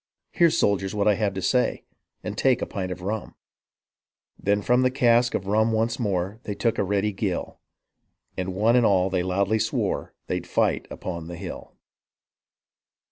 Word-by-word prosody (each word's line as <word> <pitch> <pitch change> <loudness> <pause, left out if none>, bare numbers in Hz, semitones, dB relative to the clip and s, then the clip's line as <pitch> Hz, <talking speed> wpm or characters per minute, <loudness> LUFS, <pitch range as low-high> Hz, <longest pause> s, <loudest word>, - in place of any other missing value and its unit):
Hear, 170 -2 +4
soldiers, 100 - +1
what 100 0 +1
I 105 - +6
have 100 -2 -1
to 95 - -4
say 125 -1 +1 0.4
And 105 -1 -4
take 125 +3 +2
a - - 0
pint 95 -2 -4
of 90 - -6
nmi.' 105 +3 -4 0.5
'* - - -51
Then 100 +1 +1
from 125 +3 +3
the 130 - +4
cask 120 -2 +3
of 95 - -2
rum 110 +3 +2
once 115 +1 0
more 100 -1 -1
They 105 -5 -5
took 115 +1 0
a - - +3
ready 100 +2 0
gill 95 -2 -3 0.7
When 95 0 -4
one 110 +5 +3
and 125 - +5
all 95 -3 +3
they 90 -1 +1
loudly 100 +4 +1
swore - - -2
They'd - - -3
fight - - +1
upon 85 -3 -6
the 85 0 -7
hill." - - -8
100 Hz, 180 wpm, -25 LUFS, 95-115 Hz, 0.7 s, I